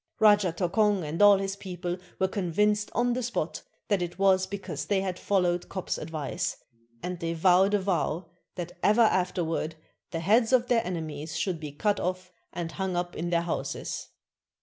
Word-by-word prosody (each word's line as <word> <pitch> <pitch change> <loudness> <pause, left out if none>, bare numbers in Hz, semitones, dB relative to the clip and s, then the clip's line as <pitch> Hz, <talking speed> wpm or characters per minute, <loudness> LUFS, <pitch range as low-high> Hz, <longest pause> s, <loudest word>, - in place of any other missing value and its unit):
Rajah 205 -5 +5
Tokong 195 +2 +2
and 160 +6 -2
all 205 -1 +8
his 195 0 -2
people 180 -2 -4 0.2
were 190 - +2
convinced 210 +3 +1
on 240 0 +2
the 255 - -1
spot 240 0 -2 0.3
that 200 -3 +1
it 175 0 -4
was 190 -1 +4
because 195 -6 -5
they 200 -2 +1
had 185 -2 -3
followed 180 -3 +1
Kop's 185 -2 -3
advice, 155 -2 -3 0.5
and 180 -1 -4
they 165 -1 -2
vowed 185 +4 +4
a - - +3
vow 185 -3 -1 0.3
that 175 -1 -5
ever 215 +3 +4
afterward 175 -5 0 0.3
the 165 -2 -3
heads 225 +7 +3
of 245 -1 +4
their 235 -2 +3
enemies 160 -3 -4
should 175 0 -1
be 150 -2 -6
cut 205 +8 0
off 185 0 -3 0.2
and 170 -1 -4
hung 190 -2 -2
up 175 0 -2
in 175 +2 -3
their 170 -1 +2
houses. 170 - -3
185 Hz, 175 wpm, -28 LUFS, 170-205 Hz, 0.5 s, all